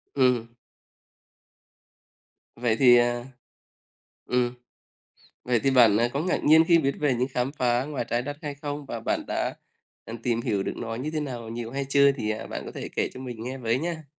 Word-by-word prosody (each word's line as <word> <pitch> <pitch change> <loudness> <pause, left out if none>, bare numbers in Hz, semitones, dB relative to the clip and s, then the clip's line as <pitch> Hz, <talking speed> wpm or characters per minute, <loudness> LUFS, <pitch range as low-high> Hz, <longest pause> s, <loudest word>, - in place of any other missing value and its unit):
Ừm. 125 -4 +3 2.1
Vậy 115 -2 +1
thì, 125 -3 +7
à 120 0 +1 1.0
ừm, 125 -1 +1 0.9
vậy 120 -2 +2
thì 135 - +3
bạn, 120 -6 +6
à, 120 +2 +3
có 140 - -1
ngạc 180 +3 -1
nhiên 160 +2 +7
khi 170 0 +5
viết 140 -3 +1
về 145 -3 +2
những 125 +2 0
khám 125 +2 0
phá 125 -3 +1
ngoài 140 -4 -3
Trái 120 +1 0
Đất 145 +2 -5
hay 145 -2 -4
không? 145 0 -6
Và 115 - -5
bạn - - -1
đã, - - -2 0.5
à, 115 - -8
tìm 120 -2 0
hiểu 100 -4 -1
được - - -3
nó 115 -1 -4
như 130 +6 -4
thế 155 -1 -2
nào, 125 -6 -5
nhiều 115 0 -5
hay 140 0 -2
chưa? 140 0 +5
Thì, 115 -6 -3
à, 110 +1 -4
bạn - - -5
có - - -7
thể - - -6
kể - - +1
cho 130 - -8
mình 120 -4 -7
nghe 130 +3 -5
với 115 0 0
nha. 165 0 -4
125 Hz, 205 wpm, -26 LUFS, 120-140 Hz, 2.1 s, thì